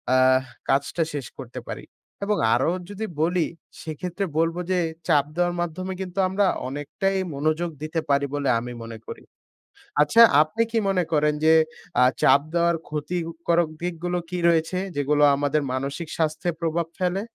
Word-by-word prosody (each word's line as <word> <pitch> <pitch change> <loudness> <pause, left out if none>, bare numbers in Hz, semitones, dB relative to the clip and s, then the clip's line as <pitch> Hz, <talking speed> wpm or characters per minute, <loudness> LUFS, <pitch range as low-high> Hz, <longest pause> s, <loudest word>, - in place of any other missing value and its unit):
আহ 130 0 +5 0.3
কাজটা 140 +5 +1
শেষ 140 -3 -4
করতে - - -7
পারি। - - -5 0.4
এবং 210 0 +1 0.2
আরো 130 +7 +2 0.2
যদি 210 +2 -4 0.2
বলি 175 +1 +2 0.4
সেক্ষেত্রে 175 +5 -4
বলব 165 +1 +2 0.2
যে, 180 - +2 0.3
চাপ 145 -2 +4
দেওয়ার 175 0 +1
মাধ্যমে 185 +3 -3
কিন্তু 185 +1 -5
আমরা 195 +2 +1 0.2
অনেকটাই 170 +8 -2 0.2
মনোযোগ 155 +4 0
দিতে 155 +1 -2
পারি 140 0 +3
বলে 140 -2 0
আমি 120 +1 -6
মনে 115 0 -8
করি। - - -8 0.8
আচ্ছা 150 +11 +5 0.2
আপনি 155 +9 0
কি 230 - 0
মনে 185 -2 +2
করেন 150 0 +3
যে, 160 - +7 0.5
আ - - +7 0.2
চাপ 140 - +6
দেওয়ার 170 0 +3
ক্ষতিকারক 165 +1 -1
দিকগুলো 175 0 -2
কি 180 -1 -3
রয়েছে? 165 +2 +1 0.2
যেগুলো 145 +1 +2
আমাদের 145 +1 +1
মানসিক 140 +5 -3
স্বাস্থ্যে 160 +2 0
প্রভাব 165 0 0
ফেলে? 185 +2 0
165 Hz, 150 wpm, -24 LUFS, 145-180 Hz, 0.8 s, যে